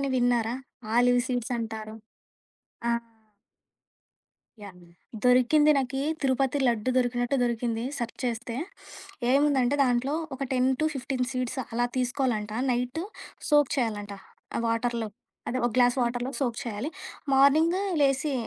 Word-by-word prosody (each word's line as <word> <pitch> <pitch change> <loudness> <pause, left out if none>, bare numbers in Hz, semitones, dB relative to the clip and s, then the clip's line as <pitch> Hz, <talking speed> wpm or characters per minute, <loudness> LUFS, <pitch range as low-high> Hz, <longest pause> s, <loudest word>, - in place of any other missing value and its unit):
అని 275 -1 -1
విన్నారా? 245 -1 +1 0.4
Olive 245 0 +4
seeds 245 -1 -2
అంటారు? 220 -1 -5 0.9
ఆ! - - +3 1.7
యాహ్! 190 -3 -10 0.5
దొరికింది. 255 +5 +5
నాకి 270 0 -2 0.2
తిరుపతి 270 0 +1
లడ్డు 235 +1 0
దొరికినట్టు 245 +1 +1
దొరికింది 235 -1 -1
సెర్చ్ 235 -2 -4
చేస్తే. 235 -1 -3 0.8
ఏముందంటే 275 -2 +3
దాంట్లో, 250 +3 +1 0.2
ఒక 270 - -11
10-15 265 0 0
సీడ్స్ 255 0 -3
అలా 240 +1 +1
తీసుకోవాలంట. 245 -4 -1 0.2
నైట్ 250 +5 -1 0.5
సోక్ 295 -2 +5
చేయాలంటా 205 -5 -2 0.4
ఆ - - 0
వాటర్‌లో. 230 0 -1 0.4
అదే 255 - -1
ఒక 240 - +2
గ్లాస్ 245 -1 +5
వాటర్‌లో 245 +1 -1
సోక్ 240 -5 -1
చేయాలి. 225 +2 -4 0.4
మార్నింగ్ 295 +6 +5 0.2
లేసి 275 +1 +2
245 Hz, 115 wpm, -27 LUFS, 235-270 Hz, 1.7 s, దొరికింది